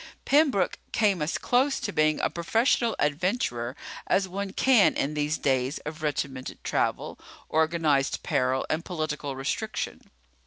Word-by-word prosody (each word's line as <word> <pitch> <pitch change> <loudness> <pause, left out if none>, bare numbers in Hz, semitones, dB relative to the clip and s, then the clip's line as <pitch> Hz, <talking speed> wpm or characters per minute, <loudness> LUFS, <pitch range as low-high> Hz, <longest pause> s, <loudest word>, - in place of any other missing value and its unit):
Pembroke 275 - +3
came 200 -6 +2
as 150 +3 -1
close 265 +3 +1
to 205 - -3
being 155 0 +2
a - - +1
professional 225 +6 +1
adventurer 145 - -1 0.3
as 190 -1 +2
one 195 +1 -4
can 240 0 +4
in 145 - -1
these 150 +1 0
days 130 0 0
of 155 +1 -6
regimented 140 -3 -3
travel, - - -1 0.3
organized 160 -3 +1
peril, 130 0 0
and 160 +1 -1
political 155 -5 -3
restriction. 135 +1 -4
155 Hz, 130 wpm, -27 LUFS, 140-200 Hz, 0.3 s, can